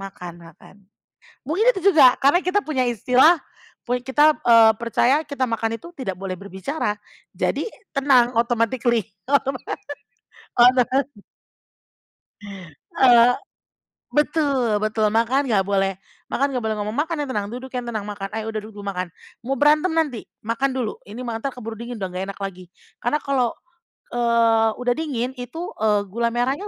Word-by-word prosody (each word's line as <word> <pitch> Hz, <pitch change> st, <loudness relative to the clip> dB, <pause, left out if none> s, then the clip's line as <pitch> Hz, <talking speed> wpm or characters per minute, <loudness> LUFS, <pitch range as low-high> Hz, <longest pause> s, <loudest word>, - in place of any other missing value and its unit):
makan, 180 Hz, -3 st, -8 dB
makan." 165 Hz, +3 st, -16 dB, 0.7 s
Mungkin 385 Hz, -, +1 dB
itu -, -, -2 dB
juga 255 Hz, -5 st, +7 dB
karena 285 Hz, +7 st, +5 dB
kita 385 Hz, +3 st, +2 dB
punya 265 Hz, -5 st, 0 dB
istilah, 255 Hz, -, +4 dB, 0.5 s
pun 245 Hz, -1 st, -1 dB
kita, 295 Hz, +4 st, +4 dB
eee, 230 Hz, -2 st, +7 dB
percaya 240 Hz, +3 st, +2 dB
kita 280 Hz, -2 st, -2 dB
makan 230 Hz, 0 st, -1 dB
itu 340 Hz, -, -11 dB
tidak 195 Hz, -9 st, -4 dB
boleh 190 Hz, -1 st, -4 dB
berbicara. 200 Hz, -, -3 dB, 0.4 s
Jadi -, -, -1 dB, 0.3 s
tenang 260 Hz, -3 st, +4 dB
automatically, 235 Hz, -1 st, +1 dB, 0.2 s
otoma 275 Hz, -2 st, +1 dB, 1.0 s
otomatis. 255 Hz, +3 st, +4 dB, 1.8 s
Eee, 245 Hz, -1 st, +6 dB, 0.8 s
betul 280 Hz, -8 st, +1 dB
betul, 215 Hz, 0 st, 0 dB
makan 230 Hz, +5 st, +2 dB
enggak 195 Hz, -3 st, +2 dB
boleh, 195 Hz, -1 st, 0 dB, 0.3 s
"Makan 280 Hz, -, +1 dB
enggak 245 Hz, -, -2 dB
boleh 220 Hz, 0 st, -1 dB
ngomong, 210 Hz, +2 st, -3 dB
makan 325 Hz, +3 st, -1 dB
yang 280 Hz, -, -6 dB
tenang, 205 Hz, -3 st, -2 dB
duduk 255 Hz, +2 st, -8 dB
yang 245 Hz, -, -2 dB
tenang, 215 Hz, -3 st, -4 dB
makan 200 Hz, -1 st, -5 dB
ayo 220 Hz, 0 st, -4 dB
udah 220 Hz, -1 st, -3 dB
duduk 210 Hz, -2 st, -10 dB
makan, 185 Hz, -3 st, -4 dB, 0.3 s
mau 265 Hz, +2 st, -2 dB
berantem 300 Hz, +4 st, +4 dB
nanti, 305 Hz, -8 st, -1 dB, 0.2 s
makan 250 Hz, +4 st, 0 dB
dulu 255 Hz, -4 st, -3 dB
ini 215 Hz, +4 st, -10 dB
malah 225 Hz, -1 st, -4 dB
entar 275 Hz, -, -1 dB
keburu 225 Hz, -3 st, -7 dB
dingin 235 Hz, +1 st, -7 dB
udah 190 Hz, -, -2 dB
enggak 185 Hz, +1 st, -5 dB
enak -, -, -16 dB
lagi." 185 Hz, -3 st, -7 dB, 0.3 s
Karena 295 Hz, +6 st, +1 dB
kalau, 265 Hz, -4 st, 0 dB, 0.7 s
eee, 230 Hz, -2 st, +3 dB
udah 245 Hz, 0 st, +2 dB
dingin 260 Hz, -6 st, -2 dB
itu, 245 Hz, +7 st, -7 dB, 0.2 s
eee, 210 Hz, -1 st, +2 dB
gula 235 Hz, +3 st, 0 dB
merahnya 265 Hz, +11 st, -1 dB
240 Hz, 155 wpm, -22 LUFS, 215-270 Hz, 1.8 s, juga